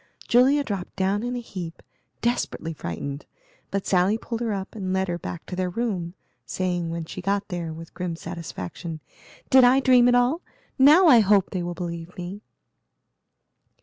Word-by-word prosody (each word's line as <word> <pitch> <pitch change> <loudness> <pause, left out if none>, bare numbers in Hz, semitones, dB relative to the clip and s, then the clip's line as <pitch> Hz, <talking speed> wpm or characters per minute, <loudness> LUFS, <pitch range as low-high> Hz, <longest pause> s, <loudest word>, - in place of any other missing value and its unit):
Julia 265 +4 +5
dropped 200 -8 -5
down 195 +2 +1
in 245 +1 -3
a - - -2
heap, 180 -7 -8 0.4
desperately 235 -8 -1
frightened, 140 - -6 0.4
but 195 -1 -2
Sally 190 +3 +3
pulled 230 0 -5
her 230 -2 -1
up 195 -1 -4
and 190 -4 -4
led 190 0 +1
her 175 0 -2
back 170 0 -7
to 180 - -6
their 185 0 -1
room, 185 -4 -3 0.3
saying, 175 +5 -2
when 165 0 -4
she 185 - -7
got 200 +3 -1
there, 175 -3 -4
with 165 +1 -10
grim 180 -2 -3
satisfaction, 165 - -7 0.5
"Did 260 -1 +8
I 250 +2 +6
dream 250 -2 +5
it 245 - +5
all? 250 +8 +2 0.4
Now 300 +8 +7
I 255 -8 +8
hope 200 -2 +3
they 185 - -2
will 175 0 -4
believe 170 -1 -6
me." 180 +3 -6
190 Hz, 175 wpm, -25 LUFS, 170-235 Hz, 0.5 s, Did